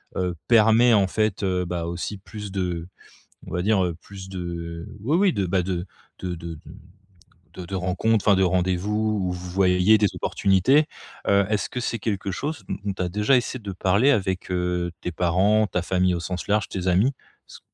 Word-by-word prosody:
heu, 90 -2 -1
permet 115 +1 +5
en 100 -2 +4
fait, 110 0 -1
heu, 90 -1 +1
bah, 85 -1 -3
aussi 85 +4 -4
plus 105 +1 -8
de 90 -3 -3 0.6
on - - -10
va 90 - 0
dire, 100 0 +2
heu, 85 -2 -3
plus 95 -1 -10
de 85 -2 -6
oui, 145 +10 +1
oui 190 -2 +3
de, 100 - 0
bah, 90 +1 +1
de 90 -1 -3 0.3
de 90 -1 -4
de 85 0 -7
de - - -13 1.0
de 90 - -7
de 95 - -7
rencontres. 95 +4 0
Enfin, 100 - +6
de 95 - +3
rendez-vous 95 +4 +1
où, 90 - -1
vous 90 0 -7
voyez 90 +2 +4
des 105 -1 +3
opportunités. 100 - +3 0.4
Heu, 100 0 +4
est-ce 105 -1 -1
que 125 - -3
c'est 115 -1 -2
quelque 100 -4 -2
chose 150 - -4
dont - - -2
dont 100 - -1
tu 95 - -4
as 90 - -1
déjà 105 +8 +2
essayé 125 +1 -4
de 100 -2 -5
parler 100 +8 +3
avec, 95 -8 0
heu, 90 -1 -1
tes - - -3
parents, 95 +6 +2
ta 90 - -1
famille 90 +1 +1
au 85 - -2
sens 90 +3 -5
large, 105 0 +1
tes 95 -2 -4
amis? 100 +9 +3 0.3
S - - -12
95 Hz, 205 wpm, -24 LUFS, 90-105 Hz, 1.0 s, Enfin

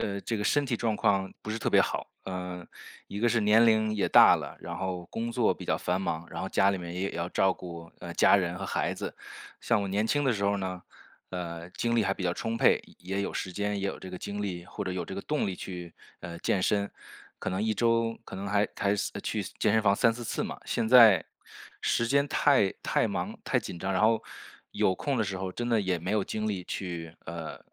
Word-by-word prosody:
呃， 100 -1 -2
这 115 - -2
个 - - -2
身 145 +7 +2
体 125 -3 -1
状 115 -3 0
况 95 -2 +2
不 110 - -5
是 110 - -2
特 - - -1
别 - - +4
好， - - +1 0.2
呃， 90 -2 -5 0.4
一 100 - -6
个 120 - +4
是 115 0 +2
年 110 +3 +6
龄 110 -1 +3
也 100 - +1
大 - - +8
了， - - -5
然 - - -6
后 90 -2 -3
工 115 +1 -3
作 120 -2 +2
比 - - -10
较 - - +2
繁 90 +1 -1
忙， 85 -3 -3
然 - - -5
后 95 - -3
家 95 +1 +3
里 95 - -2
面 85 -1 -6
也 90 - -3
也 100 - -1
要 85 +1 -3
照 95 +1 +2
顾， 85 -2 -9
呃， 85 -1 -7
家 - - +6
人 90 -3 +1
和 95 - -5
孩 - - -1
子。 - - -5 0.5
像 115 -3 +2
我 - - -2
年 105 +3 +1
轻 145 +5 +1
的 130 - +3
时 100 -3 -3
候 100 0 +2
呢， 95 -2 -4 0.5
呃， 85 -2 -5
精 120 +5 -1
力 115 - +4
还 95 -1 0
比 100 - -6
较 85 - +1
充 115 +5 -3
沛， - - +4 0.2
也 95 +2 -5
也 - - +1
有 100 - -2
时 95 - -3
间， 105 +2 -1
也 100 - -1
有 - - -4
这 95 - -9
个 90 - -6
精 100 +2 -5
力， 90 -4 -4
或 - - -6
者 95 - -3
有 90 -1 -3
这 95 - -7
个 100 - -4
动 150 +4 -1
力 95 - -2
去， 90 -2 -7 0.3
呃， 85 -1 -7
健 95 +2 0
身， 100 +1 +1 0.5
可 - - -3
能 95 +2 -1
1 110 0 +1
周 115 0 +1
可 - - -9
能 100 +1 -4
还 105 0 +2
还 100 0 +1
司 - - -1
呃， - - -6
去 - - -2 0.2
健 105 - +3
身 110 - +3
房 100 -2 +4
3-4 115 +3 +2
次 - - -2
嘛。 - - -5
现 110 - -1
在 115 -8 +8 0.6
时 115 - +1
间 140 +3 +3
太 135 -10 +3
太 - - +2
忙、 - - -3
太 - - +1
紧 85 - -7
张， 95 +3 -2
然 95 - +1
后， 110 +1 +4 0.5
有 95 - +2
空 135 +7 -1
的 - - +3
时 95 -1 -3
候 95 -1 -4
真 120 +4 -3
的 115 -2 +3
也 95 -3 0
没 90 +3 -4
有 105 -1 +2
精 110 +2 -3
力 100 -3 -2
去 85 -4 -5
呃， 85 -1 -6
100 Hz, 270 characters per minute, -29 LUFS, 90-110 Hz, 0.6 s, 大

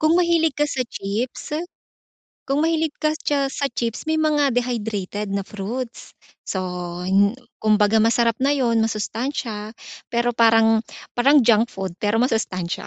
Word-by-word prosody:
Kung 310 +1 +3
mahilig 335 -2 +3
ka 295 0 +1
sa 260 -3 -1
chips 220 +9 -4 0.9
kung 275 +2 +1
mahilig 320 -2 +1
ka 305 - +3 0.2
cha 280 -2 +1
sa 280 +1 -1
chips, 235 +3 -3
may 315 - +1
mga 295 -4 +2
dehydrated 215 -5 -2
na 200 - 0
fruits. 230 +5 -6 0.3
So 190 - -2 0.4
hin 200 +4 +3 0.2
kumbaga 215 0 +3
masarap 230 +1 +2
na 275 +2 +2
'yon, 235 -5 +1
masustansya. 220 0 -3 0.4
Pero 240 +1 +2
parang 225 -1 +4 0.4
parang 275 +3 +5
junk 225 -1 +4
food 190 -3 -5
pero 215 +3 +1
masustansya. 185 -8 -2
235 Hz, 140 wpm, -22 LUFS, 210-275 Hz, 0.9 s, parang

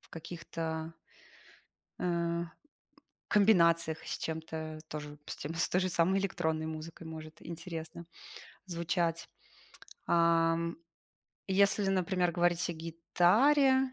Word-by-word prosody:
в - - -23
каких-то 165 -1 -5 1.1
э, 170 -1 0 0.9
комбинациях 170 -6 +4
с - - -3
чем-то 160 -1 -5
тоже 150 -1 -7
с - - -5
тем 155 +3 -5
с 170 - +2
той 180 - +2
же 185 - 0
самой 180 +3 +2
электронной 160 -5 -1
музыкой 160 +1 -7
может 160 0 -9
интересно 165 0 -7 0.6
звучать. 170 -1 -1 0.8
Ам. 170 0 +3 0.7
Если, 200 +1 +3
например, 185 -1 +1
говорить 175 0 +2
о - - -2
гитаре. 235 - +3
170 Hz, 105 wpm, -32 LUFS, 160-180 Hz, 1.1 s, комбинациях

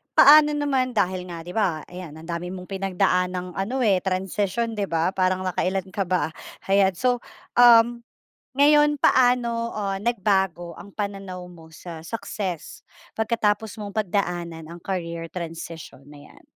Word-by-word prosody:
paano 300 +1 +8
naman 265 -4 0
dahil 185 -2 0
nga 170 -2 -7
di 175 - -8
ba, 180 -8 0
ayan 180 -4 -9
ang 160 +1 -11
dami 170 0 -4
mong 185 0 -9
pinagdaang 185 -1 0
ano 195 +7 -2
eh, 200 -5 +3
transition 195 +4 -1
transition - - -6
di 200 - 0
ba, 165 +1 0
parang 185 -1 0
nakailan 185 +1 -1
ka 195 - -1
ba? 180 -3 0 0.4
Ayan, 195 -1 +4
so 245 +4 +1 0.4
um, 240 0 +7 0.6
ngayon 295 0 +5
paano 240 -3 +3
ah, 200 -2 -2
nagbago 190 -6 0
ang 200 - -12
pananaw 195 -3 -5
mo 165 -2 -14
sa 165 0 -9
success 195 -3 -5 0.3
pagkatapos 220 -1 0
mong 205 0 -7
pagdaanan 175 -5 -2
ang 170 +1 -10
career 170 -3 -4
transition 165 -4 -7
na 145 -1 -13
'yan? - - -20
190 Hz, 150 wpm, -24 LUFS, 175-220 Hz, 0.6 s, paano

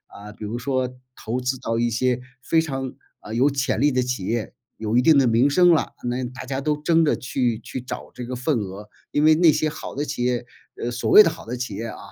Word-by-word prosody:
嗯， 105 +1 -10
比 105 - -7
如 115 +3 -4
说 130 0 0 0.3
投 120 +3 -3
资 130 +1 -2
到 115 -3 -2
一 120 0 +2
些 125 +2 0 0.2
非 165 - +3
常， 135 -4 -4 0.3
呃， 105 - -8
有 130 +5 +3
潜 135 -4 -1
力 145 +1 +4
的 130 -1 +1
企 125 -5 -3
业， 115 +1 -2 0.2
有 110 0 -2
一 125 - +5
定 155 +3 +5
的 135 - +5
名 120 +4 +4
声 175 +4 +5
了， 160 - +1
那 125 +1 -2
大 125 +1 -8
家 135 +1 -3
都 150 +1 0
争 165 +2 +3
着 150 - +2
去 125 -2 -1
去 125 +3 -6
找 125 - -7
这 125 - -7
个 125 +1 -5
份 125 +1 0
额。 100 +1 -7 0.2
因 145 - +1
为 155 +1 +7
那 165 0 +5
些 155 +1 0
好 155 - -7
的 145 +2 -2
企 120 - -3
业， 125 -1 0 0.3
呃， 120 - -2
所 120 0 -2
谓 215 - +10
的 - - +2
好 160 - -10
的 125 +2 -4
企 120 -5 -4
业 115 +3 -4
啊， 110 - -8
125 Hz, 270 characters per minute, -23 LUFS, 120-145 Hz, 0.3 s, 谓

